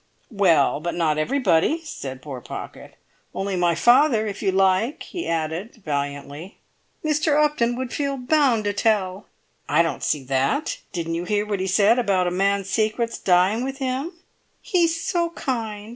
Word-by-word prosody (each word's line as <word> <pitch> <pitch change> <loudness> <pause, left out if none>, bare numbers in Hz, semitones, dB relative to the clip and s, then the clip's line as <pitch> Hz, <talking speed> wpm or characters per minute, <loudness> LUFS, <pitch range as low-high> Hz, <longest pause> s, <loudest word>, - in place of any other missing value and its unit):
"Well, 170 -10 +3
but 170 +2 -3
not 155 -3 +1
everybody," 245 - +2
said 130 - -7
poor 135 -4 -7
Pocket. - - -9 0.4
"Only 195 0 -2
my 175 -2 +2
father, 240 - +4
if 205 -2 -5
you 195 - +1
like!" 195 - +1
he 345 - -6
added, 165 +7 -3
valiantly. 145 +4 -4 0.5
"Mr. 300 0 +2
Upton 295 -6 +2
would 255 -1 -5
feel 280 -1 -2
bound 255 -3 +2
to 205 0 -1
tell." 200 -2 0 0.4
"I 150 +4 +4
don't 165 - -3
see 145 -3 -1
that. 135 - -1
Didn't 165 -2 -3
you 170 +1 -3
hear 205 +2 0
what 205 -2 -2
he 190 - -2
said 210 +5 +4
about 195 -6 +1
a 175 - 0
man's 195 +1 0
secrets 220 +3 -1
dying 190 +5 +3
with 270 +1 -4
him?" 270 +5 -3 0.5
"He's 335 -2 +1
so 340 0 0
kind! 225 -9 -4
205 Hz, 160 wpm, -23 LUFS, 175-255 Hz, 0.5 s, father